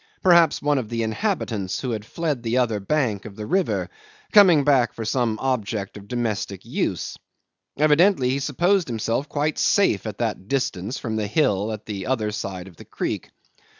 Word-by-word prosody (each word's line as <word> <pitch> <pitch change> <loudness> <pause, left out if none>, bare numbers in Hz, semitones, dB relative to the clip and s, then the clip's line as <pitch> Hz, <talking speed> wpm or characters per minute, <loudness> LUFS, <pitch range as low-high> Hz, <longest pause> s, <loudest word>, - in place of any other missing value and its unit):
Perhaps 170 -2 +5
one 145 -1 +2
of 115 -4 -5
the 115 -1 -1
inhabitants, 110 - -2
who 130 - -3
had 110 -2 -3
fled 155 +5 -2
to - - -18
the 115 +1 -1
other 115 -4 +1
bank 110 -2 -1
of 105 -3 -9
the 105 - -6
river, 190 - 0 0.4
coming 185 -9 +7
back 135 -5 +3
for 115 - -6
some 115 -1 0
object 110 -6 -2
of 100 -1 -11
domestic 110 -5 -3
use. - - -3 0.6
Evidently 150 -2 +4
he 135 - 0
supposed 175 +7 +1
himself 115 +4 -2
quite 150 +1 -1
safe 150 - +2
at 105 - -5
that 110 -5 -3
distance 125 -4 -2
from 110 -2 -3
the 105 -1 -1
hill 105 -5 +1
on 110 -1 -4
the 100 -3 -5
other 115 -5 0
side 95 -3 -5
of 90 -4 -15
the - - -12
creek. - - -4
120 Hz, 185 wpm, -23 LUFS, 105-145 Hz, 0.6 s, coming